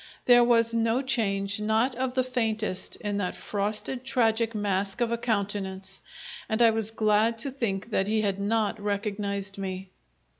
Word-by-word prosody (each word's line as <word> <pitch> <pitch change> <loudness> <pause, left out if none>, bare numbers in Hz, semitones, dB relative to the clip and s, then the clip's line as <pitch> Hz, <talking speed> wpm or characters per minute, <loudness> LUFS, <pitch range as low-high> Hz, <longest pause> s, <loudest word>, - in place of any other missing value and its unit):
There 245 -1 +7
was 230 -1 +3
no 230 +3 +1
change, 200 -5 0
not 220 +4 +1
of 255 +1 -2
the 255 - +2
faintest, 220 -6 -1
in 205 -1 -3
that 190 -3 -2
frosted 210 +5 -3
tragic 230 -3 +1
mask 200 -1 -1
of 235 -1 +1
a 235 - 0
countenance, 200 -4 -2 0.5
and 220 - 0
I 230 -1 +6
was 220 -1 -1
glad 220 +1 +2
to 270 +5 +2
think 230 -5 -3
that 195 -2 +1
he 215 +1 +1
had 200 -2 -1
not 210 0 0
recognized 200 -1 -3
me. 190 -1 -5
215 Hz, 160 wpm, -27 LUFS, 200-230 Hz, 0.5 s, There